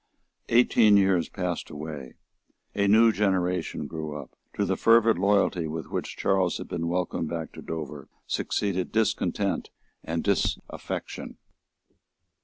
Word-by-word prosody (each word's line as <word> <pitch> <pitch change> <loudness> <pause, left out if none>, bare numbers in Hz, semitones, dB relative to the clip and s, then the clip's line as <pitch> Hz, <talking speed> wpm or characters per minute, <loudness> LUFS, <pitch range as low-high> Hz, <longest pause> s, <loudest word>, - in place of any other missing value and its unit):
Eighteen 115 -3 +5
years 95 -4 +3
passed 90 -3 -3
away. 75 -3 -7 0.6
A 100 0 +1
new 110 +3 +6
generation 90 -6 0
grew 75 -1 -5
up. 70 - -12 0.2
To - - +1
the - - 0
fervid 115 -3 +4
loyalty 100 -4 +2
with 80 +1 -6
which - - -4
Charles 95 -3 +1
had - - -7
been 85 -1 -3
welcomed 85 -2 -1
back 80 -1 -4
to - - -10
Dover 75 -4 -6 0.2
succeeded 95 -3 -1
discontent 110 0 0 0.3
and 80 0 -2
disaffection. 100 -1 -2
90 Hz, 125 wpm, -27 LUFS, 80-100 Hz, 0.6 s, new